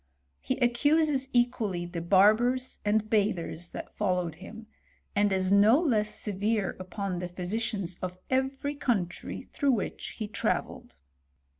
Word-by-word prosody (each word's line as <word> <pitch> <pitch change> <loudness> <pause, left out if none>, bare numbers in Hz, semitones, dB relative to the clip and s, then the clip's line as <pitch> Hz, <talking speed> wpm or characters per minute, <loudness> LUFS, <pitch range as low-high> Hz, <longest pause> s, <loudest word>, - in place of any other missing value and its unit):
He 70 - -2
accuses 275 +3 +3
equally 230 -8 +1
the 175 -1 -5
barbers 215 +8 +3
and 215 +1 +1
bathers 200 -5 0
that - - -8
followed 180 -5 0
him, 220 +3 -10 0.5
and 205 0 +3
is 190 0 +1
no 210 +7 +6
less 220 -11 0
severe 205 0 -1
upon 185 0 -4
the 180 - -3
physicians 185 0 -3
of 180 0 -4
every 270 +2 -1
country 210 -11 -2
through 280 -3 +2
which 215 - -4
he 215 - -3
travelled. 205 - -2
210 Hz, 130 wpm, -28 LUFS, 185-245 Hz, 0.5 s, no